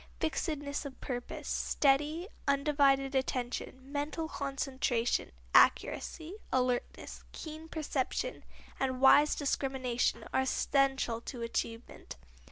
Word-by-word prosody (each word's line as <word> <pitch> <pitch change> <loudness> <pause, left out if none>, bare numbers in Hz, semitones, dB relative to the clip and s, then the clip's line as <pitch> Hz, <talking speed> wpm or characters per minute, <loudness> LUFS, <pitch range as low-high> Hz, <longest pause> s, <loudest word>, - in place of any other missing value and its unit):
Fixedness 295 -3 -2
of 280 -2 -8
purpose, 245 -2 -5
steady, 295 +5 +1 0.2
undivided 280 -1 +3
attention, 260 -1 -2
mental 295 +3 -2
concentration, 270 -5 -1 0.2
accuracy, 340 +4 +3
alertness, 250 -1 -1
keen 315 0 -8
perception 310 - -2 0.4
and 260 -1 0
wise 290 +3 +6
discrimination 265 -3 0
are - - +3
essential 270 -3 +1
to 240 -1 -6
achievement. 230 0 -4
275 Hz, 90 wpm, -32 LUFS, 255-295 Hz, 0.4 s, wise